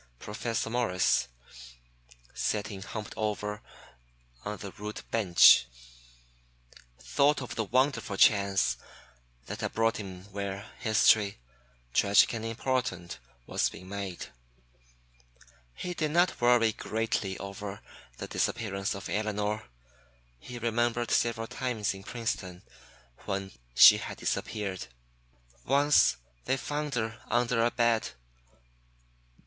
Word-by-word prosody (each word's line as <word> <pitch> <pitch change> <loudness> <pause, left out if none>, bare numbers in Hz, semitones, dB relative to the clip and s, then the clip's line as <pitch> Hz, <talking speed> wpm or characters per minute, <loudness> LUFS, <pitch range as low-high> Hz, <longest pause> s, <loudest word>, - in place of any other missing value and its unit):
Professor 110 - -3
Morris, 115 - +1 1.1
sitting 105 -2 -2
humped 105 +1 -6
over 105 0 -3 0.8
on 105 0 -4
the 100 -1 -8
rude 105 +2 -7
bench, 90 - +6 1.3
thought 140 - +2
of 125 -5 -6
the 110 - -2
wonderful 120 -3 +1
chance 100 -2 +4 0.7
that - - -6
had - - -3
brought 115 0 +1
him 95 -3 -8
where 100 0 -4
history, 110 -2 +3 0.6
tragic 100 +3 +5
and 115 -1 -4
important, 115 -6 -2 0.3
was - - 0
being 90 +1 -12
made. 100 -3 -5 1.5
He 180 - -4
did 155 -3 -1
not 175 0 +2
worry 120 -2 +5
greatly 110 -4 -2
over 100 +1 -7 0.4
the - - -6
disappearance 100 -2 -2
of 100 - -7
Elinor. 105 0 -2 0.7
He 120 - -9
remembered 120 0 0
several 115 -1 +1
times 115 -4 -2
in 95 - -10
Princeton 95 -6 -4 0.6
when 95 0 -3 0.2
she - - +10
had - - -6
disappeared. 100 - -3 0.8
Once 145 +2 +4 0.3
they 135 - +1
found 145 0 -3
her 115 -1 -3
under 120 -1 +2
a 120 - +3
bed. 120 -2 +1
110 Hz, 110 wpm, -29 LUFS, 100-120 Hz, 1.5 s, she